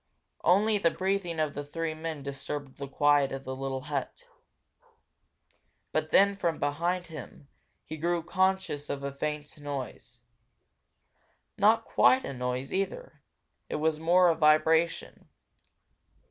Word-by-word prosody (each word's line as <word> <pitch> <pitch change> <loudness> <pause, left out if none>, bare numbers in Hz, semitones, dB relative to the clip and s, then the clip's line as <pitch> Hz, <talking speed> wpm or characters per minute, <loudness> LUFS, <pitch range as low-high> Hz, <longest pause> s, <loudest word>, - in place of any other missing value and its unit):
Only 205 +4 +4
the 170 - +3
breathing 190 -2 -2
of 155 -2 0
the 145 - -5
three 160 +2 -3
men 155 -2 -6
disturbed 140 0 -6
the 140 - -5
quiet 145 0 +3
of 135 0 -5
the 130 0 -5
little 135 0 -4
hut. 485 - -5 1.6
But - - -1
then, 200 0 +5
from 170 -4 -1
behind 170 +5 -1
him, 150 -3 -11 0.4
he 155 - -7
grew 170 +1 0
conscious 185 -4 0
of 140 0 -4
a 140 - -3
faint 150 +1 -5
noise. 135 -4 -7 1.4
Not 225 +2 +4
quite 260 +1 +4
a 140 - -5
noise, 125 +1 -3
either, 195 - -3 0.5
it - - -3
was 155 0 0
more 175 +2 +5
a 165 - +2
vibration. 160 +2 +2
155 Hz, 135 wpm, -29 LUFS, 140-180 Hz, 1.6 s, then